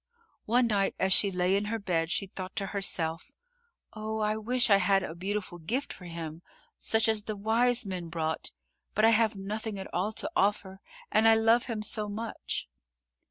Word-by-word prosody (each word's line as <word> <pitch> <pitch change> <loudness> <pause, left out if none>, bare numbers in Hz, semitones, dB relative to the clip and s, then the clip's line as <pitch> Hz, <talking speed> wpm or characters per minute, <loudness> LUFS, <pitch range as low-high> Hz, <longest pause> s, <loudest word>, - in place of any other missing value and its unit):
One 245 +3 +3
night 205 -4 +1
as 190 0 +3
she 200 - +5
lay 180 0 +1
in 200 +1 0
her 225 +2 -2
bed, 170 -6 -1
she 195 - 0
thought 185 0 -8
to 200 - -1
herself: 180 - -1 0.6
"Oh, 220 0 -4
I 215 0 +1
wish 240 +2 +1
I 200 - +8
had 195 0 +3
a 165 - -5
beautiful 190 0 -4
gift 240 - -2
for 180 - -12
him, 165 -1 -6 0.3
such 220 0 +2
as 215 -2 +1
the 215 - -3
wise 230 +4 +2
men 180 -3 -5
brought, 160 -1 -2 0.4
but 215 - +4
I 225 - +6
have 220 -1 +3
nothing 210 +2 -4
at 190 - -8
all 185 +5 0
to - - -3
offer 195 -1 0 0.3
and 220 +1 +4
I 225 - +7
love 225 +2 +3
him 220 -3 -3
so 210 0 -2
much." 220 +2 -4
205 Hz, 190 wpm, -29 LUFS, 185-220 Hz, 0.6 s, I